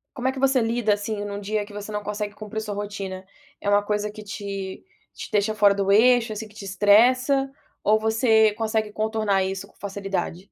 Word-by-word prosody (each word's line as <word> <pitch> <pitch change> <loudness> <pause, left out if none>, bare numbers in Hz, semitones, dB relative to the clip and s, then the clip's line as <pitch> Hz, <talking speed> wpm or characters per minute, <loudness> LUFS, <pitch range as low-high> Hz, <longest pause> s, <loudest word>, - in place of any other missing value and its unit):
como 255 0 -2
é - - +3
que 265 - -7
você 270 -2 +3
lida, 225 -2 +1
assim, 205 0 -4
num 200 0 -5
dia 210 +1 -2
que 205 - -14
você 205 +1 -7
não 210 0 -3
consegue 210 0 -4
cumprir 220 0 -5
sua 210 -1 -5
rotina? 200 -2 -5 0.4
É 205 - -1
uma 205 0 +4
coisa 210 0 -1
que 210 0 -10
te 195 -2 -6 0.3
te - - -8
deixa 210 +1 +1
fora 205 -2 +4
do 195 0 +1
eixo, 230 +1 +5
assim, 215 +1 -6
que 210 - -21
te 200 - -9
estressa? 255 +8 +4 0.3
Ou 215 +1 +4
você 220 -1 +3
consegue 220 -1 -1
contornar 215 -3 0
isso 195 +1 -4
com - - -26
facilidade? 195 -3 -4
210 Hz, 205 wpm, -24 LUFS, 200-220 Hz, 0.4 s, eixo